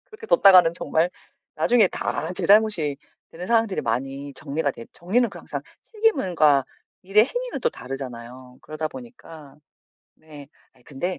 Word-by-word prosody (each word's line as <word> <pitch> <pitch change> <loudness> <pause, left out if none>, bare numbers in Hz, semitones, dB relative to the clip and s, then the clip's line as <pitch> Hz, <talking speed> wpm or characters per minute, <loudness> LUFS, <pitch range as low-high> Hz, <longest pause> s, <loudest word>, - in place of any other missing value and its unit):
그렇게 445 0 -12
뒀다가는 185 - +6
정말 170 0 0 0.5
나중에 235 -5 +3
다 160 0 -4
제 - - -2
잘못이 200 -9 +3 0.3
되는 180 +2 -8
상황들이 225 -3 +1
많이 135 +4 -4
정리가 140 +2 -3
됐 115 - -12
정리는 225 +8 0
그 185 - -11
항상 140 -3 -6 0.2
책임은 430 - -1
과 145 -4 +4 0.4
일의 205 +4 +4
행위는 - - -5
또 480 - +2
다르잖아요. 125 - -9
그러다 155 +1 -5
보니까 165 - -13 0.6
네. 150 -3 -14 0.2
아이 125 - -26
근데 150 +8 -5
165 Hz, 325 characters per minute, -23 LUFS, 140-215 Hz, 0.6 s, 뒀다가는